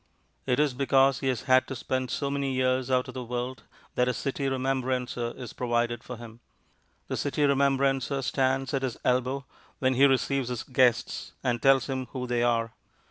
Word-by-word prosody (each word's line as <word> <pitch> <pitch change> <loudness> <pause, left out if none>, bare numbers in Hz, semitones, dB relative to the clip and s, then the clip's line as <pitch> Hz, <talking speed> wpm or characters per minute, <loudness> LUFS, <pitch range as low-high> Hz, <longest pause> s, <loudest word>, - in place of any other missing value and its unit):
It 125 +1 +2
is 150 -3 +2
because 135 +1 +3
he 135 - -2
has 125 -3 -1
had 130 -1 +4
to 135 - -5
spend 130 +1 -2
so 140 -1 -2
many 140 -1 -1
years 130 0 +1
out 130 +1 +2
of 130 - -8
the 130 0 -5
world 125 +2 -4 0.3
that 125 - +2
a 125 - 0
City 135 +3 -2
Remembrancer 130 -2 -1
is 125 -3 -8
provided 120 -1 -1
for 125 - -7
him. 115 0 -11 0.7
The - - -2
City 145 +1 -1
Remembrancer 135 -1 +2
stands 135 +1 0
at 135 - +1
his 130 -3 -3
elbow 130 +2 +1 0.3
when 130 0 +2
he 135 +2 +5
receives 135 -1 +1
his 125 -2 -3
guests 125 -2 +1
and 120 -2 0
tells 135 -1 +5
him 130 -2 -3
who 125 -1 -3
they 120 -1 0
are. 115 -1 +1
130 Hz, 190 wpm, -27 LUFS, 125-135 Hz, 0.7 s, he